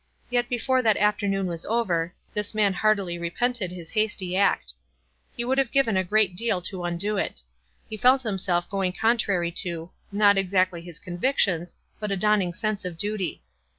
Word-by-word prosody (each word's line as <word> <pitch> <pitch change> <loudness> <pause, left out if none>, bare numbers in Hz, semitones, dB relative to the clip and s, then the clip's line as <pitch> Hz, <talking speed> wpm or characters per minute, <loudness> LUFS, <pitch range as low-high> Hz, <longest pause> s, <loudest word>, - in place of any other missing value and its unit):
Yet 245 0 +1
be 245 - 0
fore 260 +2 +2
that 220 -3 +3
afternoon 200 -2 +1
was 170 -2 -4
over, 180 -7 0 0.2
this 210 0 -3
man 205 -2 +3
heartily 195 -3 +1
repented 205 +4 -1
his 170 -2 -9
hasty 210 -4 -1
act. 185 - +2 0.6
He 240 - -1
woifW 265 +2 +1
have 265 -3 +1
given 270 -7 +2
a 190 - +2
great 200 -1 +2
deal 225 -1 0
to 180 0 -4
undo 185 +5 -1
it. 65 - -3 0.4
He 215 - -6
felt 255 +5 +4
himself 185 -5 0
going 190 -2 -1
contrary 200 -6 +1
to 170 -1 -5
— - - -42
not 200 -1 +5
exactly 185 -2 +1
his 170 -2 -10
convictions, 180 -2 0 0.2
but 210 -1 -3
a 195 - 0
dawning 195 -3 +2
sense 215 -1 -2
of 180 -2 -5
duty. 200 - -3
195 Hz, 180 wpm, -25 LUFS, 175-215 Hz, 0.6 s, not